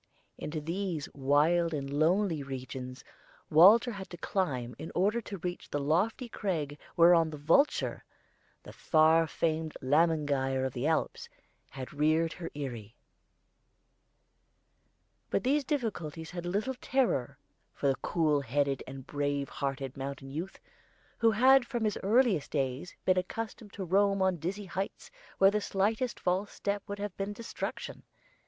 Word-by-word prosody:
Into 155 Hz, +1 st, -4 dB
these 170 Hz, 0 st, -3 dB
wild 155 Hz, +5 st, +2 dB
and 140 Hz, -2 st, -3 dB
lonely 160 Hz, +4 st, +1 dB
regions 130 Hz, -1 st, -7 dB, 0.5 s
Walter 200 Hz, +10 st, +7 dB
had 195 Hz, -3 st, -7 dB
to 175 Hz, -, -9 dB
climb 135 Hz, -10 st, -2 dB
in 160 Hz, -, -6 dB
order 205 Hz, +6 st, +2 dB
to 205 Hz, -2 st, -7 dB
reach 175 Hz, 0 st, -5 dB
the 145 Hz, -, -1 dB
lofty 180 Hz, -, 0 dB
crag 155 Hz, -10 st, -3 dB, 0.2 s
whereon 170 Hz, -1 st, +6 dB
the 155 Hz, -, -7 dB
vulture 165 Hz, -, +2 dB, 0.6 s
the -, -, -11 dB
far 160 Hz, +1 st, +4 dB
famed 160 Hz, -1 st, -2 dB
Lämmergeier 145 Hz, -2 st, +1 dB
of 130 Hz, -, -3 dB
the 125 Hz, +3 st, -1 dB
Alps 160 Hz, -, -1 dB, 0.4 s
had 130 Hz, 0 st, -8 dB
reared 155 Hz, +2 st, +2 dB
her 170 Hz, -2 st, -6 dB
eyrie. 120 Hz, -7 st, -6 dB, 2.3 s
But -, -, 0 dB
these 285 Hz, +3 st, +2 dB
difficulties 200 Hz, -, -3 dB
had 175 Hz, -1 st, -5 dB
little 210 Hz, +8 st, -1 dB
terror 245 Hz, -, 0 dB, 0.3 s
for -, -, -6 dB
the 135 Hz, -, +3 dB
cool 155 Hz, -4 st, +1 dB
headed 140 Hz, +1 st, 0 dB
and 135 Hz, 0 st, -8 dB
brave 145 Hz, -1 st, -2 dB
hearted 135 Hz, -1 st, -4 dB
mountain 135 Hz, 0 st, -6 dB
youth, 170 Hz, +7 st, -5 dB, 0.6 s
who 230 Hz, -, +5 dB
had 255 Hz, +3 st, +5 dB
from 240 Hz, -4 st, -2 dB
his 210 Hz, -2 st, 0 dB
earliest 215 Hz, -, +3 dB
days 135 Hz, +3 st, -2 dB
been 185 Hz, 0 st, +4 dB
accustomed 220 Hz, +2 st, -6 dB
to 195 Hz, -, -5 dB
roam 195 Hz, +2 st, +3 dB
on 190 Hz, -2 st, +2 dB
dizzy 190 Hz, +6 st, -4 dB
heights 190 Hz, +2 st, -5 dB, 0.3 s
where 195 Hz, 0 st, +6 dB
the 210 Hz, 0 st, 0 dB
slightest 215 Hz, +6 st, 0 dB
false 185 Hz, +3 st, 0 dB
step 200 Hz, 0 st, -2 dB
would 200 Hz, -, -5 dB
have 205 Hz, -2 st, -5 dB
been 200 Hz, +1 st, -3 dB
destruction. 230 Hz, +2 st, -6 dB
165 Hz, 145 wpm, -30 LUFS, 145-200 Hz, 2.3 s, Walter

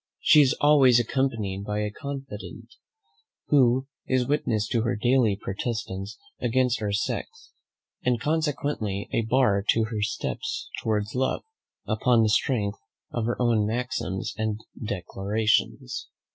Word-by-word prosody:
She 150 Hz, -, +6 dB
is 135 Hz, -3 st, +3 dB
always 135 Hz, -5 st, +6 dB
accompanied 115 Hz, -6 st, -1 dB
by 105 Hz, +1 st, -2 dB
a 105 Hz, 0 st, -2 dB
confident, 135 Hz, -3 st, -8 dB, 0.8 s
who 130 Hz, -2 st, +4 dB, 0.2 s
is 130 Hz, -2 st, +1 dB
witness 115 Hz, -7 st, 0 dB
to 115 Hz, -, +1 dB
her 120 Hz, +2 st, 0 dB
daily 120 Hz, -2 st, +2 dB
protestations 100 Hz, 0 st, -4 dB, 0.2 s
against 125 Hz, 0 st, +1 dB
our 105 Hz, -1 st, -1 dB
sex, 100 Hz, -, -3 dB, 0.5 s
and 125 Hz, -2 st, +1 dB
consequently 145 Hz, -9 st, -1 dB
a -, -, +2 dB
bar 115 Hz, -4 st, +2 dB
to 115 Hz, -, +4 dB
her 110 Hz, -, -3 dB
first 105 Hz, 0 st, 0 dB
steps 455 Hz, -, -4 dB
towards 105 Hz, -2 st, -1 dB
love, 130 Hz, +1 st, 0 dB, 0.4 s
upon 115 Hz, +1 st, +3 dB
the 110 Hz, -, +3 dB
strength 105 Hz, -2 st, +1 dB, 0.3 s
of 120 Hz, -2 st, -2 dB
her 120 Hz, -, -2 dB
own 115 Hz, -4 st, +2 dB
maxims 110 Hz, -5 st, -2 dB
and 110 Hz, -1 st, -2 dB, 0.2 s
declarations. 105 Hz, -, -1 dB
115 Hz, 130 wpm, -26 LUFS, 105-130 Hz, 0.8 s, She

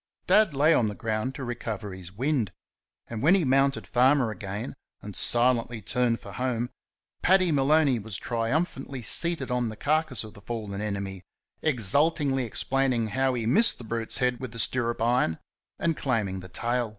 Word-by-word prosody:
Dad 210 Hz, -8 st, +4 dB
lay 150 Hz, +4 st, +4 dB
on 120 Hz, -7 st, +3 dB
the 105 Hz, -, -4 dB
ground 110 Hz, +4 st, -2 dB
to 140 Hz, -, -6 dB
recover 110 Hz, -4 st, -5 dB
his 90 Hz, -1 st, -9 dB
wind, 125 Hz, -1 st, -1 dB, 0.6 s
and 115 Hz, -2 st, -5 dB
when 165 Hz, +8 st, +5 dB
he 185 Hz, -5 st, +1 dB
mounted 135 Hz, +1 st, +2 dB
Farmer 130 Hz, -1 st, +3 dB
again 100 Hz, +3 st, -5 dB, 0.3 s
and 105 Hz, -1 st, -8 dB
silently 120 Hz, -1 st, +2 dB
turned 115 Hz, +3 st, 0 dB
for -, -, -10 dB
home, 125 Hz, -2 st, -2 dB, 0.5 s
Paddy 185 Hz, -1 st, +4 dB
Maloney 140 Hz, -2 st, +3 dB
was 105 Hz, -1 st, -4 dB
triumphantly 130 Hz, +2 st, -2 dB
seated 160 Hz, +2 st, +2 dB
on 125 Hz, -2 st, 0 dB
the 110 Hz, -, -7 dB
carcase 155 Hz, +3 st, 0 dB
of 110 Hz, -1 st, -11 dB
the 100 Hz, -, -14 dB
fallen 105 Hz, -2 st, -5 dB
enemy, 100 Hz, -3 st, -4 dB, 0.4 s
exultingly 140 Hz, -, +2 dB
explaining 125 Hz, -1 st, 0 dB
how 130 Hz, +3 st, +1 dB
he 115 Hz, -2 st, -2 dB
missed 190 Hz, -, +4 dB
the -, -, -10 dB
brute's 115 Hz, 0 st, -3 dB
head 125 Hz, -2 st, 0 dB
with 130 Hz, -3 st, -6 dB
the -, -, -9 dB
stirrup 120 Hz, 0 st, +1 dB
iron, 120 Hz, -9 st, +2 dB, 0.4 s
and 165 Hz, -1 st, 0 dB
claiming 105 Hz, -10 st, -1 dB
the 90 Hz, 0 st, -10 dB
tail. 120 Hz, +4 st, -1 dB
120 Hz, 170 wpm, -27 LUFS, 110-135 Hz, 0.6 s, when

